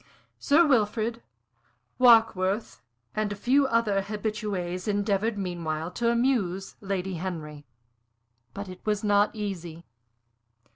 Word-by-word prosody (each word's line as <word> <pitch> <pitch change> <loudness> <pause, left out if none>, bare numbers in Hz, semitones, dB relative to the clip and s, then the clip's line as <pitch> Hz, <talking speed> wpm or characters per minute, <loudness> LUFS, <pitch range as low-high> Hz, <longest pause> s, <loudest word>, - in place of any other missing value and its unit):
Sir 320 +4 +4
Wilfrid, 230 -3 +1 0.8
Warkworth, 225 -4 +4 0.3
and 215 -1 -1
a - - -3
few 265 +7 +2
other 225 -5 +1
habitués 205 -3 -3
endeavored 205 +1 0
meanwhile 170 -3 -3
to 235 +5 0
amuse 235 -6 0
Lady 190 -2 -3
Henry. 155 -5 -6 0.9
But 200 0 -5
it 185 0 -11
was 210 -1 -1
not 205 0 +3
easy. 175 -6 -5
205 Hz, 105 wpm, -27 LUFS, 185-225 Hz, 0.9 s, Sir